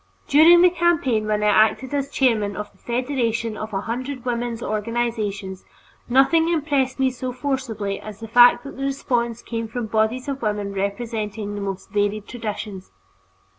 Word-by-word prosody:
During 330 Hz, +4 st, +7 dB
the 360 Hz, -, +6 dB
campaign 305 Hz, -11 st, +1 dB
when 210 Hz, 0 st, 0 dB
I 210 Hz, -, +4 dB
acted 220 Hz, +7 st, +3 dB
as 280 Hz, -1 st, -1 dB
chairman 220 Hz, -6 st, +1 dB
of 210 Hz, 0 st, -6 dB
the 190 Hz, -, -28 dB
federation 235 Hz, -3 st, -1 dB
of 215 Hz, +1 st, -6 dB
a 195 Hz, -1 st, -2 dB
hundred 255 Hz, +3 st, -5 dB
women's 240 Hz, -1 st, -2 dB
organizations, 215 Hz, -3 st, -2 dB, 0.5 s
nothing 275 Hz, +6 st, +4 dB
impressed 285 Hz, -5 st, 0 dB
me 265 Hz, -1 st, +2 dB
so 255 Hz, 0 st, -5 dB
forcibly 250 Hz, -7 st, -3 dB
as 215 Hz, -1 st, -9 dB
the 225 Hz, -, -7 dB
fact 245 Hz, +2 st, +6 dB
that 280 Hz, -, -9 dB
the 270 Hz, -, -4 dB
response 240 Hz, -4 st, -1 dB
came 230 Hz, -1 st, -4 dB
from 235 Hz, +1 st, -4 dB
bodies 220 Hz, +5 st, 0 dB
of 275 Hz, -1 st, -4 dB
women 210 Hz, -2 st, -2 dB
representing 210 Hz, +1 st, -3 dB
the 205 Hz, -, -5 dB
most 195 Hz, 0 st, -5 dB
varied 205 Hz, 0 st, -1 dB
traditions. 210 Hz, -5 st, -6 dB
230 Hz, 165 wpm, -22 LUFS, 210-265 Hz, 0.5 s, During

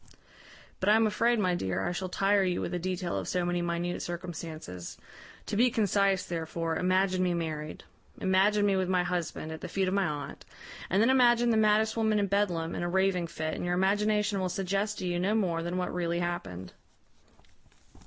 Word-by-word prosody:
"But 190 Hz, -, +1 dB
I 210 Hz, -, +7 dB
am 225 Hz, 0 st, +4 dB
afraid, 235 Hz, +3 st, +2 dB
my 185 Hz, -4 st, +1 dB
dear, 95 Hz, -, -2 dB
I -, -, -1 dB
shall 185 Hz, +1 st, -4 dB
tire 195 Hz, +2 st, +2 dB
you 180 Hz, -1 st, 0 dB
with -, -, -3 dB
a 180 Hz, -, -1 dB
detail 180 Hz, 0 st, -3 dB
of -, -, -6 dB
so 180 Hz, -1 st, 0 dB
many 175 Hz, 0 st, 0 dB
minute 175 Hz, +1 st, -2 dB
circumstances. 160 Hz, -, -6 dB, 0.5 s
To 210 Hz, -, -3 dB
be 245 Hz, +4 st, +4 dB
concise, 200 Hz, -4 st, +1 dB
therefore, 165 Hz, -1 st, -3 dB
imagine 185 Hz, 0 st, +1 dB
me 180 Hz, -1 st, +1 dB
married; 155 Hz, -2 st, -4 dB, 0.4 s
imagine 200 Hz, +2 st, +3 dB
me 200 Hz, -1 st, +3 dB
with 185 Hz, -1 st, 0 dB
my 180 Hz, -1 st, +2 dB
husband, 175 Hz, -3 st, -3 dB
at 160 Hz, -, -7 dB
the -, -, -5 dB
feet 190 Hz, -1 st, -1 dB
of 185 Hz, -, 0 dB
my 195 Hz, -2 st, +2 dB
aunt; 145 Hz, -2 st, -6 dB, 0.5 s
and 195 Hz, +4 st, +3 dB
then 245 Hz, -, +4 dB
imagine 240 Hz, -2 st, +4 dB
the -, -, +2 dB
maddest 220 Hz, 0 st, +3 dB
woman 220 Hz, -2 st, +2 dB
in 205 Hz, -, +2 dB
Bedlam, 180 Hz, -5 st, 0 dB
in -, -, -3 dB
a 175 Hz, -, -1 dB
raving 190 Hz, -1 st, +1 dB
fit, 155 Hz, -1 st, -4 dB
and -, -, -4 dB
your 175 Hz, 0 st, 0 dB
imagination 205 Hz, +2 st, +1 dB
will 185 Hz, -1 st, -1 dB
suggest 195 Hz, +3 st, -1 dB
to 185 Hz, -, -4 dB
you 175 Hz, -1 st, -1 dB
no 200 Hz, +4 st, +1 dB
more 175 Hz, -6 st, 0 dB
than 175 Hz, +2 st, -3 dB
what 180 Hz, -, -2 dB
really 170 Hz, -1 st, -1 dB
happened. 95 Hz, -, -4 dB
185 Hz, 205 wpm, -29 LUFS, 175-205 Hz, 0.5 s, I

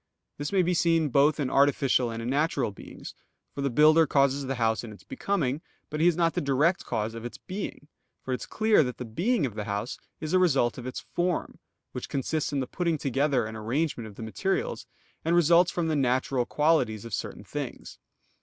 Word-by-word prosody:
_ -, -, -53 dB, 0.4 s
This 145 Hz, -, -3 dB
may 190 Hz, -2 st, +3 dB
be 180 Hz, +1 st, +1 dB
seen 165 Hz, -2 st, +2 dB
both 140 Hz, +4 st, +3 dB
in 135 Hz, -3 st, -1 dB
artificial 135 Hz, -3 st, +3 dB
and 115 Hz, 0 st, -5 dB
in 120 Hz, -, -3 dB
natural 140 Hz, -5 st, +1 dB
beings: 100 Hz, -, -10 dB, 0.4 s
for 140 Hz, -, -5 dB
the 140 Hz, -, +1 dB
builder 155 Hz, +5 st, +5 dB
causes 140 Hz, 0 st, +2 dB
the 135 Hz, -, -1 dB
house 115 Hz, -1 st, +1 dB
in 115 Hz, -, -8 dB
its 105 Hz, -, -14 dB
becoming, 170 Hz, -, -1 dB, 0.3 s
but 150 Hz, -, -3 dB
he 165 Hz, -, +4 dB
is 175 Hz, -, +4 dB
not 165 Hz, -1 st, +2 dB
the -, -, -1 dB
direct 145 Hz, +6 st, +2 dB
cause 110 Hz, -1 st, -2 dB
of 115 Hz, 0 st, -7 dB
its 120 Hz, -, -7 dB
being. 190 Hz, -6 st, -6 dB, 0.4 s
For 130 Hz, -, -3 dB
it 125 Hz, -, -3 dB
is -, -, -7 dB
clear 220 Hz, -3 st, +3 dB
that 125 Hz, -2 st, -4 dB
the 125 Hz, -, -5 dB
being 180 Hz, -, 0 dB
of 120 Hz, -, -4 dB
the 105 Hz, 0 st, -4 dB
house 100 Hz, +3 st, -3 dB, 0.2 s
is 155 Hz, +2 st, -4 dB
a 185 Hz, -, +5 dB
result 135 Hz, -9 st, +2 dB
of 125 Hz, -, -7 dB
its 130 Hz, -, -5 dB
form, 175 Hz, 0 st, -1 dB, 0.3 s
which -, -, -6 dB
consists 140 Hz, +3 st, -1 dB
in 140 Hz, -2 st, 0 dB
the -, -, -1 dB
putting 170 Hz, +4 st, -1 dB
together 135 Hz, -2 st, +1 dB
and 110 Hz, +1 st, -6 dB
arrangement 120 Hz, +2 st, -2 dB
of 105 Hz, -, -12 dB
the 115 Hz, -, -7 dB
materials, 390 Hz, -, -2 dB, 0.4 s
and 165 Hz, +2 st, +2 dB
results 175 Hz, +1 st, +5 dB
from 170 Hz, -2 st, -1 dB
the 160 Hz, -, +1 dB
natural 130 Hz, -2 st, +1 dB
qualities 130 Hz, -9 st, +1 dB
of 115 Hz, -, -8 dB
certain -, -, -4 dB
things. -, -, -6 dB
140 Hz, 220 wpm, -27 LUFS, 120-165 Hz, 0.4 s, builder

